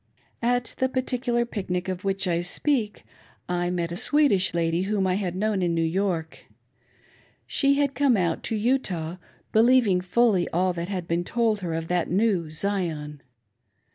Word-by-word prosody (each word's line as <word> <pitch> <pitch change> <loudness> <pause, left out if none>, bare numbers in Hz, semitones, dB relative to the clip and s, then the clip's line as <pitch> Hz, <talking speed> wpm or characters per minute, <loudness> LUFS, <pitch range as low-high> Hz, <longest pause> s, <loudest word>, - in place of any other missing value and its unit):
At 245 0 0
the 260 - +2
particular 250 -2 0
pic 205 -6 -6
nic 180 0 -1
of 185 -1 -4
which 195 -1 -1
I 170 -1 +1
speak, 215 +4 -1 0.4
I 175 0 -1
met 170 -2 -2
a - - -3
Swedish 245 -4 +3
lady 165 0 0
whom 195 0 0
I 185 - +1
had 185 -2 -2
known 205 0 0
in 170 -2 0
New 165 - +1
York. 170 -1 -2 1.0
She 280 -1 +2
had 280 -1 +1
come 275 -5 +3
out 170 -3 0
to 225 - -1
Utah, 200 -8 -1 0.3
believing 225 -5 +4
fully 190 -1 +2
all 180 +2 +1
that 170 +1 -5
had 180 -4 -4
been 170 +1 0
told 225 0 0
her 170 -3 -3
of 165 0 -4
that 175 -1 0
new 185 -4 +1
Zion. 155 -4 -3
190 Hz, 170 wpm, -25 LUFS, 175-230 Hz, 1.0 s, believing